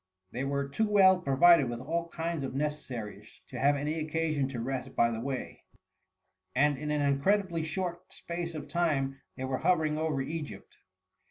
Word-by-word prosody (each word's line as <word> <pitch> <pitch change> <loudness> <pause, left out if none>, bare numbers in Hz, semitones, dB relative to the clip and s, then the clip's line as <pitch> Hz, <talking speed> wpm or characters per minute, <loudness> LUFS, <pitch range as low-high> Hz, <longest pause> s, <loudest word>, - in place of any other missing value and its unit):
They 125 - -3
were 140 0 -1
too 215 +11 0
well 190 -3 +6
provided 165 -2 +5
with 120 -1 -4
all 165 +6 -2
kinds 165 -2 -3
of 135 -1 -4
necessaries 135 -7 -5
to - - -6
have 145 +2 +4
any 150 +3 -2
occasion 155 -2 0
to 130 -3 -5
rest 130 +2 -4
by 115 0 +3
the 115 -1 -3
way, 130 0 -5 0.9
and 145 +2 +4
in 150 +3 -5
an 150 -1 +1
incredibly 170 +5 +2
short 175 +2 -4
space 170 -1 -5
of 150 -1 -6
time 140 -5 0 0.2
they 130 - -4
were 130 0 -2
hovering 160 -3 +2
over 155 -3 0
Egypt. 150 +2 -6
150 Hz, 170 wpm, -30 LUFS, 135-165 Hz, 0.9 s, well